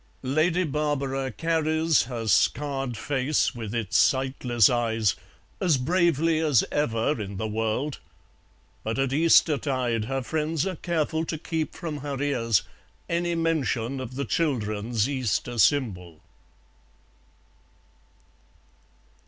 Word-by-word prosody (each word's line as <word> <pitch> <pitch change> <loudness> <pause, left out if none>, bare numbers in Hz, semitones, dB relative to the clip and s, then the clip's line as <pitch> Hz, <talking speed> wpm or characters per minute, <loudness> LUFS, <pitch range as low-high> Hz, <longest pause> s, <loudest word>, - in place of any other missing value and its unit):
Lady 155 +7 +1
Barbara 140 -3 -1
carries 160 +1 +1
her 120 -2 -5
scarred 135 +2 +1
face 135 +4 0
with 115 -2 -6
its 115 -5 0
sightless 130 -4 +3
eyes 115 -3 +1 0.4
as 170 -7 +3
bravely 165 +2 +2
as 150 -7 +3
ever 120 -2 0
in 100 -1 -6
the 110 - -3
world, 110 +6 -2 0.8
but 110 +2 -2
at 135 -1 0
Eastertide 135 -7 +3
her 135 +2 -2
friends 155 +3 -1
are 190 -1 -2
careful 160 -2 -1
to 160 -1 -4
keep 160 0 -3
from 160 -4 -5
her 140 -1 -5
ears 120 -7 +1 0.4
any 170 0 -1
mention 140 -6 -1
of 130 -1 -7
the 140 +1 -2
children's 115 -6 -1
Easter 120 -3 -2
symbol. 90 - +1
135 Hz, 110 wpm, -26 LUFS, 115-155 Hz, 0.8 s, sightless